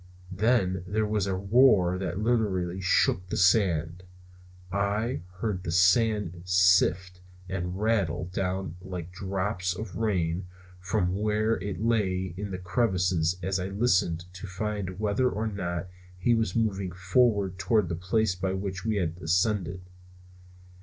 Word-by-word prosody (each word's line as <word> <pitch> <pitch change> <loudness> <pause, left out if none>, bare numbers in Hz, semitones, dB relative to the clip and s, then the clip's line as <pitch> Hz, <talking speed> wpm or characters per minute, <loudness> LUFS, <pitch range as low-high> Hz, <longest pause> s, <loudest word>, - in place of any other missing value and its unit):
Then 95 -3 +1
there 110 +3 0
was 105 -2 0
a 95 - 0
roar 100 -3 +4
that 90 -1 -3
literally 100 -5 0
shook 90 0 +2
the - - -2
sand. 90 -4 +2 0.7
I 100 0 -1
heard 95 0 -3
the 90 - -6
sand 90 0 +2
sift 90 0 +3 0.3
and 90 0 -3
rattle 100 -6 0
down 95 -2 -2
like 90 -2 -7
drops 95 0 -2
of 105 0 -7
rain 90 -5 -1 0.3
from 90 0 0
where 110 +1 +1
it 100 +1 -4
lay 95 -6 0
in 100 +2 -5
the 95 - -4
crevices 90 -3 0
as 95 +1 0
I 90 - -2
listened 95 -5 +1
to 95 +2 -8
find 100 -1 -4
whether 105 +4 +1
or 110 -1 -3
not 90 -4 -3 0.3
he 120 +6 +2
was 110 -5 0
moving 100 -5 0
forward 95 0 +1
toward 100 0 +2
the 85 - -2
place 95 +4 0
by 95 +1 -2
which 95 -1 -4
we 110 -1 0
had 85 -4 -1
ascended. 90 +1 0
95 Hz, 140 wpm, -27 LUFS, 90-105 Hz, 0.7 s, roar